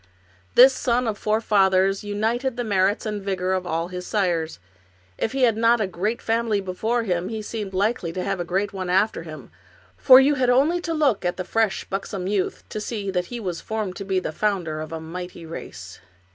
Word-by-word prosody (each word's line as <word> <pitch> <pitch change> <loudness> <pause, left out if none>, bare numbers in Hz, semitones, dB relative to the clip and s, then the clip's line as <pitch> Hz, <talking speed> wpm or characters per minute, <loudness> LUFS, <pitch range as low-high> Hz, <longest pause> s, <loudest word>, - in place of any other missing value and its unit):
This 260 +2 +8
son 245 -1 0
of 220 - -1
four 215 +1 0
fathers 195 -2 +3
united 230 +5 -1
the 245 - -1
merits 200 -1 +1
and 210 -1 -2
the - - -12
vigor 190 -1 -1
of 185 -1 -2
all 165 +1 -2
his 180 0 -6
sires. 175 -6 0 0.6
If 225 - -1
he 270 -1 0
had 230 -3 +4
not 230 +1 +3
had 210 - 0
a - - -13
great 210 +8 -2
family 225 -2 +1
before 215 +5 -1
him 180 -3 -1
he 220 -1 -4
seemed 210 -2 -5
likely 200 -3 0
to 185 0 -3
have 195 -1 -2
a - - -1
great 190 +4 -1
one 185 -2 -4
after 190 +3 +2
him, 155 -2 -10 0.5
for 260 -1 +8
you 275 +2 +4
had 255 -3 +1
only 295 +8 +3
to 330 -2 -2
look 275 -11 +2
at 175 0 -1
the 185 - -4
fresh, 220 0 0
buxom 195 -1 -4
youth 195 -1 -1
to 215 - -4
see 205 -3 -3
that 180 -1 -1
he 245 - -6
was 180 -6 -4
formed 215 -4 -3
to 200 - -5
be 190 -1 0
the 180 - -4
founder 170 -4 -1
of 155 - -7
a 165 - -4
mighty 175 +1 -7
race. 90 - -9
200 Hz, 220 wpm, -23 LUFS, 180-225 Hz, 0.6 s, This